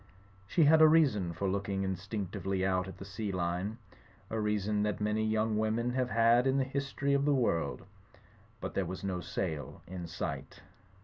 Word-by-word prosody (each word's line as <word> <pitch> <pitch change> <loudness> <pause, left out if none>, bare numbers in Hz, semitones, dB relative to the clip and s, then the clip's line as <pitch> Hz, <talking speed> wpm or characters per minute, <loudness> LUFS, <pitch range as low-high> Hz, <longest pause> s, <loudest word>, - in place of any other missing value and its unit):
She 165 - +3
had 160 +2 +6
a 155 - +10
reason 135 - +3
for 85 +4 -2
looking 100 0 -1
instinc 95 +1 -3
tively 95 -1 -1
out 95 -1 +1
at 95 - -9
the 95 - -8
sea 100 +1 -4
line; 90 +4 -2 0.5
a 110 - -1
reason 105 0 0
that 105 0 -1
many 105 +1 0
young 110 0 +1
women 110 +3 0
have 125 0 0
had 115 +3 +4
in 135 +1 +2
the 135 - +3
history 140 +1 -1
of 140 0 +3
the 145 -1 +3
world. 85 - 0 0.8
But - - -4
there 95 -3 -1
was 95 +1 -6
no 95 -2 -2
sail 80 -9 -4
in 90 -1 -6
sight. 85 -5 -5
105 Hz, 185 wpm, -32 LUFS, 95-120 Hz, 0.8 s, a